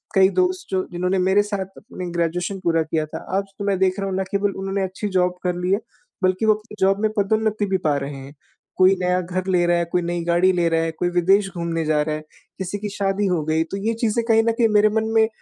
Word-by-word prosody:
कई 190 0 +6
दोस्त, 370 - 0
जो 185 -1 +1
जिन्होंने 180 +2 0
मेरे 190 +3 +3
साथ 200 -2 -3
अपनी 185 -4 -7
ग्रेजुएशन 175 +3 -1
पूरा 165 -1 +2
किया 155 0 -1
था, - - -8
आज 200 - +1 0.2
तो 200 - -3
मैं 195 -2 +1
देख 190 +1 +1
रहा 195 - -2
हूँ, 190 - -2
ना 190 - 0
केवल 200 0 0
उन्होंने 195 0 -2
अच्छी 190 +3 -4
जॉब 180 -1 +1
कर 180 -1 0
ली 180 +1 -1
है, 200 - +2 0.4
बल्कि 185 +4 +2
वो 215 - +6
अपनी 210 0 -12
जॉब 195 +1 +3
में 215 - +2
पदोन्नति 215 +1 +1
भी 190 -1 0
पा 145 - +2
रहे 140 0 -5
हैं। 135 +2 -10 0.4
कोई 185 +1 +6
नया 180 0 +1
घर 185 +1 -4
ले 180 -2 +2
रहा 175 0 +3
है, 170 - 0
कोई 180 - +2
नई 170 0 -2
गाड़ी 175 +2 +3
ले 175 -1 +2
रहा 165 0 +1
है, 165 - -1
कोई 175 +2 -1
विदेश 195 +3 +3
घूमने 165 -1 -2
जा 150 -1 +2
रहा 155 0 -2
है, 155 - -6 0.4
किसी 190 +2 -3
की 210 0 -4
शादी 200 0 -1
हो 175 -4 0
गई, 160 +1 +1
तो 195 +4 -6
ये 230 - +2
चीज़ें 230 0 +1
कहीं 225 0 +4
न 230 - +2
कहीं 230 0 +2
मेरे 210 0 +4
मन 220 +1 0
में, 220 0 +5
185 Hz, 260 wpm, -22 LUFS, 175-205 Hz, 0.4 s, कई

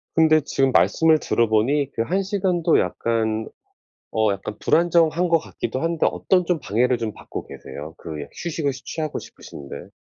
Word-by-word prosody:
근데 160 -1 +5
지금 135 -2 +1
말씀을 160 +2 +4
들어 115 -1 +1
보니 135 +6 +1
그 115 - -1
1 190 +8 0
시간도 185 -4 +1
약간 110 +3 -1 0.7
어 110 -2 +2
약간 100 +2 -6
불안정한 170 0 +3
것 165 -1 +4
같기도 130 -4 -5
한데 165 -1 +1
어떤 180 -2 +1
좀 180 -3 +1
방해를 120 +3 +1 0.2
받고 - - -8
계세요 75 +5 -9
그 80 -3 -6
여 - - -7
휴식을 155 -4 -2
쉬 130 - -11
취하고 155 -2 -3
싶으신데? 70 -1 -10
140 Hz, 325 characters per minute, -22 LUFS, 110-165 Hz, 0.7 s, 근데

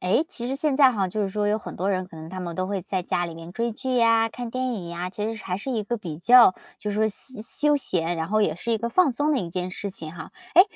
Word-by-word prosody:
诶， 185 - +2
其 240 -1 -5
实 265 - -1
现 295 0 +1
在 270 -2 +7
哈， 200 -4 0
就 210 +4 -2
是 200 - 0
说 205 +1 -1
有 210 - +2
很 - - -8
多 190 - -1
人， 185 -1 0
可 165 - -12
能 160 0 -8
他 185 +2 -6
们 170 -2 -5
都 185 - -1
会 195 -2 -2
在 190 -1 -2
家 175 - 0
里 165 - -7
面 165 +1 -9
追 235 +4 -1
剧 255 +3 -2
呀、 230 -1 +4
看 240 +1 -6
电 255 +1 -1
影 180 -6 -6
呀， 170 +1 -4
其 210 +2 -4
实 225 +1 -2
是 210 - -10
还 180 - -2
是 210 +7 -5
一 225 -4 -1
个 240 +4 -1
比 170 -8 -6
较 240 +1 +7 0.3
就 210 - -3
是 205 - -3
说 220 0 +3
休 215 +2 -6
休 295 +6 +1
闲， 175 - -1
然 160 0 -2
后 215 +1 +3
也 155 - +1
是 230 +6 -2
一 225 - +1
个 235 +2 -2
放 315 +2 +4
松 290 +5 +1
的 285 - +2
一 180 - -3
件 180 +1 -3
事 200 +2 -5
情 160 -4 -8
哈。 160 - -9 0.2
诶， 365 - +12
210 Hz, 335 characters per minute, -25 LUFS, 180-240 Hz, 0.3 s, 诶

